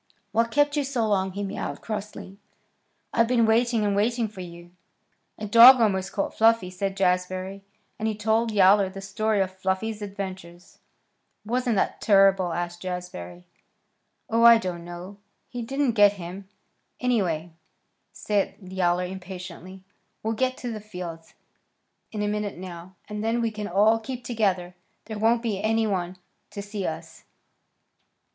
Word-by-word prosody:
"What 230 Hz, +2 st, +2 dB
kept 290 Hz, +3 st, +2 dB
you 295 Hz, -, +1 dB
so 255 Hz, -5 st, -1 dB
long?" 190 Hz, -2 st, 0 dB
he 200 Hz, +1 st, -4 dB
mewed 195 Hz, -, -5 dB
crossly. 210 Hz, -2 st, -6 dB, 0.7 s
"I've 230 Hz, 0 st, +3 dB
been 235 Hz, -2 st, +3 dB
waiting 230 Hz, 0 st, +2 dB
and 200 Hz, -1 st, +1 dB
waiting 230 Hz, +3 st, +1 dB
for 205 Hz, -3 st, -10 dB
you." 170 Hz, 0 st, -11 dB, 0.7 s
"A 215 Hz, -, -5 dB
dog 235 Hz, +5 st, +9 dB
almost 190 Hz, -4 st, +1 dB
caught 195 Hz, 0 st, -2 dB
Fluffy," 225 Hz, -4 st, +3 dB
said 195 Hz, +1 st, -3 dB
Jazbury; 185 Hz, +1 st, -1 dB, 0.4 s
and 220 Hz, -, -1 dB
he 220 Hz, -, -1 dB
told 220 Hz, +2 st, +1 dB
Yowler 195 Hz, -1 st, +5 dB
the 195 Hz, +1 st, -9 dB
story 205 Hz, +2 st, 0 dB
of 190 Hz, -1 st, -1 dB
Fluffy's 190 Hz, +3 st, -2 dB
adventures. 190 Hz, -3 st, -8 dB, 0.7 s
"Wasn't 245 Hz, +1 st, 0 dB
that -, -, -1 dB
terrible?" 195 Hz, -3 st, +4 dB
asked 175 Hz, +1 st, -4 dB
Jazbury. 175 Hz, -, -6 dB, 0.8 s
"Oh, 230 Hz, +1 st, +1 dB
I 235 Hz, 0 st, +9 dB
don't 180 Hz, -5 st, -4 dB
know. 175 Hz, +3 st, -9 dB, 0.3 s
He 245 Hz, -, -5 dB
didn't 270 Hz, +2 st, 0 dB
get 205 Hz, -2 st, +5 dB
him, 190 Hz, +1 st, -9 dB, 0.5 s
anyway," 180 Hz, -10 st, 0 dB, 0.6 s
said 205 Hz, -2 st, -1 dB
Yowler 180 Hz, -2 st, 0 dB
impatiently. 185 Hz, 0 st, -9 dB, 0.4 s
"We'll 220 Hz, +1 st, 0 dB
get 255 Hz, +3 st, -1 dB
to 245 Hz, -, -5 dB
the 215 Hz, -2 st, -6 dB
fields 180 Hz, -5 st, -8 dB, 0.8 s
in 210 Hz, -2 st, -3 dB
a -, -, 0 dB
minute 210 Hz, -2 st, -3 dB
now, 180 Hz, 0 st, -9 dB
and 210 Hz, 0 st, -5 dB
then 225 Hz, +2 st, 0 dB
we 230 Hz, -1 st, 0 dB
can 210 Hz, -1 st, -5 dB
all 210 Hz, +5 st, +3 dB
keep 250 Hz, +2 st, -7 dB
together. 195 Hz, -6 st, -1 dB, 0.3 s
There 220 Hz, -2 st, -6 dB
won't 230 Hz, +2 st, +2 dB
be 210 Hz, -4 st, -2 dB
any 225 Hz, +1 st, +1 dB
one 185 Hz, -3 st, -2 dB, 0.3 s
to 200 Hz, -, -7 dB
see 205 Hz, -1 st, -4 dB
us." 160 Hz, -, -7 dB
200 Hz, 150 wpm, -25 LUFS, 185-225 Hz, 0.8 s, dog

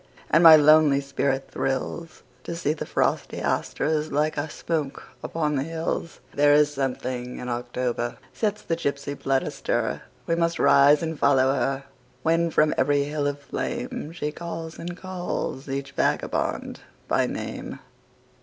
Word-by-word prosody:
And 165 Hz, +2 st, +5 dB
my 165 Hz, -1 st, +11 dB
lonely 155 Hz, -1 st, +6 dB
spirit 140 Hz, -1 st, -2 dB
thrillsTo 160 Hz, +5 st, -4 dB
see 155 Hz, -3 st, 0 dB
the 155 Hz, -, -6 dB
frosty -, -, 0 dB
asters 155 Hz, 0 st, -1 dB
like 150 Hz, +2 st, +1 dB
a 150 Hz, +2 st, -2 dB
smoke 150 Hz, -3 st, -4 dB
upon 150 Hz, -2 st, -1 dB
the 135 Hz, -, 0 dB
hills. 165 Hz, +1 st, -4 dB
There 145 Hz, 0 st, +5 dB
is 150 Hz, 0 st, +4 dB
something 125 Hz, -2 st, -3 dB
in 125 Hz, -, -5 dB
October 120 Hz, 0 st, -2 dB, 0.2 s
sets 210 Hz, -1 st, -1 dB
the 165 Hz, -, -1 dB
gypsy 140 Hz, -3 st, -3 dB
blood 135 Hz, -1 st, 0 dB
astir; -, -, -2 dB, 0.2 s
We 165 Hz, -, 0 dB
must 170 Hz, 0 st, +1 dB
rise 145 Hz, +3 st, +5 dB
and 160 Hz, -2 st, -3 dB
follow 135 Hz, -1 st, +4 dB
her, 135 Hz, +1 st, -1 dB, 0.4 s
When 165 Hz, +1 st, +2 dB
from 155 Hz, -1 st, +3 dB
every 140 Hz, +2 st, +3 dB
hill 145 Hz, 0 st, -2 dB
of 145 Hz, 0 st, -5 dB
flameShe 240 Hz, -, -4 dB
calls 165 Hz, -1 st, -6 dB
and 175 Hz, +1 st, -6 dB
calls 180 Hz, -7 st, -4 dB
each 140 Hz, +1 st, -3 dB
vagabond -, -, -1 dB, 0.3 s
by -, -, +2 dB
name. -, -, -5 dB
150 Hz, 145 wpm, -25 LUFS, 135-165 Hz, 0.4 s, my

